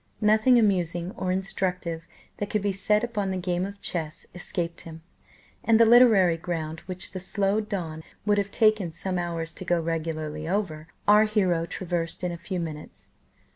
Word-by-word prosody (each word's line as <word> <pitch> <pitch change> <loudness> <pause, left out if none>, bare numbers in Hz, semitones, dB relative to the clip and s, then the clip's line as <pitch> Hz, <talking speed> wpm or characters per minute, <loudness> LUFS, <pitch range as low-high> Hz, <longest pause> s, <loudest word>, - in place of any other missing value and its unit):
Nothing 215 +4 +5
amusing 180 -5 +1
or 185 -5 -3
instructive 180 -3 -2 0.3
that 205 - -3
could 210 -2 -1
be 205 - +1
said 210 +3 +1
upon 210 -5 -2
the 190 - -2
game 180 0 -1
of 200 0 -10
chess 160 -3 -3
escaped 175 -1 -3
him, 160 -1 -10 0.6
and 225 -1 +4
the 230 - +8
literary 220 -8 +6
ground, 160 -2 -4
which 185 0 -3
the 185 - -5
slow 195 +2 0
Don 170 -7 -4 0.2
would 205 -1 +3
have 200 0 -1
taken 215 -5 +2
some 180 +2 -3
hours 165 -2 -3
to - - -7
go 175 -1 +1
regularly 155 -1 -3
over, 170 -6 -2 0.2
our 210 +1 +7
hero 185 -6 +1
traversed 175 -2 -3
in 180 - 0
a - - -4
few 180 +2 -4
minutes. 155 -3 -7
180 Hz, 175 wpm, -26 LUFS, 165-205 Hz, 0.6 s, the